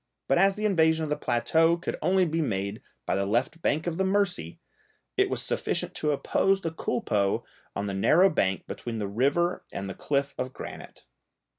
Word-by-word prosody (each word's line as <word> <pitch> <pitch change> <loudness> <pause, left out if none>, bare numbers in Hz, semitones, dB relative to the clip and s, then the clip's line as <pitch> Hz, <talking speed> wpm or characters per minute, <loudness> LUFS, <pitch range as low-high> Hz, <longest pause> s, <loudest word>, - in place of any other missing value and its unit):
But - - +3
as 195 0 +4
the 215 0 -3
invasion 160 -5 +3
of 155 - -3
the 150 - +1
plateau 160 +6 +2
could 170 - -4
only 185 0 +3
be 165 0 -1
made 100 -6 -2 0.2
by - - 0
the 100 - +1
left 125 +10 0
bank 155 0 0
of 170 -2 -2
the 190 - +1
Mercy, 190 - 0 0.6
it - - +3
was - - -2
sufficient - - -2
to 150 - 0
oppose 195 +6 +1
the 165 - -2
culpeux 105 - 0 0.3
on 100 - -2
the 100 - -3
narrow 165 - +4
bank 95 -9 0
between 120 -2 -5
the 105 -2 -2
river 140 - +1
and 100 - -5
the 95 - -5
cliff 140 +6 -1
of 130 0 -3
granite. - - -9
150 Hz, 190 wpm, -27 LUFS, 110-175 Hz, 0.6 s, as